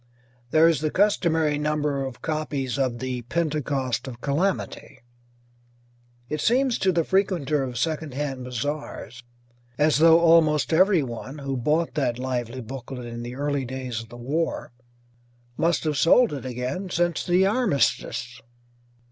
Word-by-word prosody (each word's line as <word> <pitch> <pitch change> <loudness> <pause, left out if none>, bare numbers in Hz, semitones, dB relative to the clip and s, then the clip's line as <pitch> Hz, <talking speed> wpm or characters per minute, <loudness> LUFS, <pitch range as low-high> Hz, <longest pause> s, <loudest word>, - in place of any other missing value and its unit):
There 160 +5 +5
is 165 -3 +2
the 155 - 0
customary 160 -6 +2
number 150 -2 0
of 130 -2 -7
copies 145 -4 -2
of 130 -3 0
"The 125 -1 -4
Pentecost 140 -3 -2
of 120 -2 -8
Calamity"; 160 +9 -2 1.3
it 150 +2 -3
seems 255 +1 +2
to 190 - +3
the 170 -2 +1
frequenter 175 -7 +1
of 125 -2 -5
second 155 0 -2
hand 135 -3 -3
bazaars 125 -1 -5 0.6
as 150 0 +3
though 165 +1 +7
almost 165 -2 +4
everybody 150 - +1
who 135 -1 -2
bought 150 +7 0
that 130 -6 0
lively 125 -1 -3
booklet 125 +1 -7
in 120 0 -6
the 120 +1 -6
early 145 0 -1
days 130 -2 -4
of 115 - -13
the 120 - -11
war 145 +7 -2 0.8
must 165 +3 +1
have 155 -2 -1
sold 230 - +5
it 135 -2 -6
again 130 +10 -4
since 175 -1 0
the 180 +2 +3
armistice. 175 - 0
145 Hz, 140 wpm, -25 LUFS, 130-165 Hz, 1.3 s, though